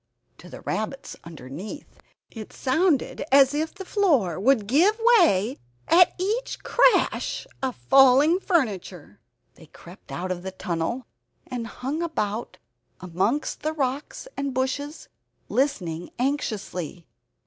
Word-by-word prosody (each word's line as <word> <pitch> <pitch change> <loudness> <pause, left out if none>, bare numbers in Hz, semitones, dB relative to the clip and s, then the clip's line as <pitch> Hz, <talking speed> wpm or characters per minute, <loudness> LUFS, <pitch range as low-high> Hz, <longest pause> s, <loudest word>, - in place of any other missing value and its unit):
To 180 - -13
the - - -10
rabbits 220 +6 -4
underneath 165 - -9 0.3
it 220 -3 -9
sounded 300 +2 0
as 275 0 +6
if 315 +4 -2
the 385 -2 -8
floor 280 - +1
would 230 0 +3
give 345 - +3 0.2
way 220 - +2 0.3
at 355 +1 +5
each 425 +7 -2
crash - - +2 0.2
of 260 -2 -2
falling 270 +6 +5
furniture. 195 - -2 0.3
They 160 - -17
crept 175 +5 -15
out 185 +1 -4
of 180 -1 -3
their 190 +1 -6
tunnel, 180 +8 -3 0.4
and 240 -2 -5
hung 275 +8 -4
about 230 -10 -3 0.4
amongst 190 - -1
the 310 +1 -2
rocks 280 - -3
and 275 -1 -3
bushes, 285 +4 -3 0.4
listening 175 - -1
anxiously. 205 - -3
255 Hz, 120 wpm, -25 LUFS, 185-300 Hz, 0.4 s, as